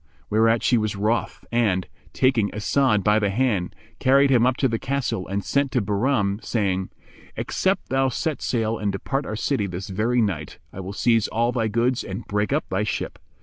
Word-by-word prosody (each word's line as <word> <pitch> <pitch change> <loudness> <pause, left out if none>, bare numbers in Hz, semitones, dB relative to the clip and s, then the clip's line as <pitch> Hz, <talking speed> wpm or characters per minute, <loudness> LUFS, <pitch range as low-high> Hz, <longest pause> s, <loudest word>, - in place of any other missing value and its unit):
Whereat 115 +1 +3
she 120 - +3
was 110 -1 -1
wroth 110 +4 -1
and, 105 -6 +1 0.2
taking 125 -6 +2
As'ad 110 0 +2
by 105 +1 +4
the 105 -2 +1
hand, 100 -5 0 0.2
carried 135 +1 +4
him 125 -1 +5
up 130 -1 +1
to 135 - +2
the 115 -2 -2
castle 135 -8 -2
and 100 0 -3
sent 140 -1 +1
to 125 - +3
Bahram, 105 -1 0
saying, 95 -4 -1 0.5
"Except - - -1
thou 135 0 +2
set 155 +4 -2
sail 115 -2 -1
and 105 -1 0
depart 135 +8 -3
our 110 - -3
city 115 -1 0
this 90 +1 -6
very 110 +6 +1
night, 80 -8 -3 0.2
I - - -8
will 95 +1 -6
seize 115 0 +2
all 120 +2 0
thy 115 -3 0
goods 120 +4 +1
and 95 -1 -6
break 105 +2 -1
up 150 +3 0
thy 95 +2 0
ship." 105 - -3
110 Hz, 190 wpm, -23 LUFS, 100-125 Hz, 0.5 s, him